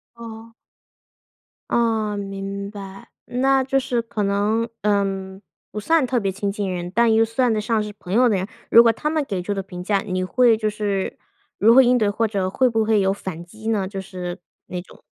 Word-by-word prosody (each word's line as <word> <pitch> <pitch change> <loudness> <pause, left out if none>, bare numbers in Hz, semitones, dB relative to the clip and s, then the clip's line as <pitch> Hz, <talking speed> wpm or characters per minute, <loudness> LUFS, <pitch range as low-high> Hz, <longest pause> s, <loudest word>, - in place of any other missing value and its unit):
哦。 230 -1 -10 1.2
哦， 220 -3 +1
明 200 0 -5
白， 195 -2 -10 0.2
那 265 +2 +2
就 270 +1 0
是 250 -3 0
可 225 -2 -3
能， 205 +3 +1 0.2
嗯， 195 -2 -1 0.3
不 210 - -5
算 325 +4 +3
特 255 - 0
别 200 -4 0
亲 200 +1 -3
近 200 -1 -3
人， 175 -1 -4
但 235 +2 +3
又 225 +1 +4
算 235 +2 +1
得 215 - 0
上 215 0 0
是 210 - -6
朋 180 -1 -6
友 245 +3 +5
的 205 - +2
人， 190 +1 -3 0.2
如 230 - +9
果 230 - +5
他 300 - -2
们 310 -1 0
给 195 -7 -3
出 205 +3 -2
的 195 - -2
评 180 -2 -8
价， 200 +1 +1
你 185 -2 -2
会 235 +4 +4
就 215 -1 -1
是 205 -2 -2 0.4
如 225 +3 +5
何 265 - +9
应 250 0 +4
对？ 215 -4 +2
或 220 +3 0
者 200 -3 -1
会 255 +6 +2
不 225 -2 +1
会 215 -2 +3
有 190 0 +2
反 190 -4 -6
击 215 +6 -11
呢？ 210 -4 +1
就 195 +1 -6
是 180 -1 -6 0.5
那 - - -14
种 - - -21
210 Hz, 225 characters per minute, -22 LUFS, 195-230 Hz, 1.2 s, 如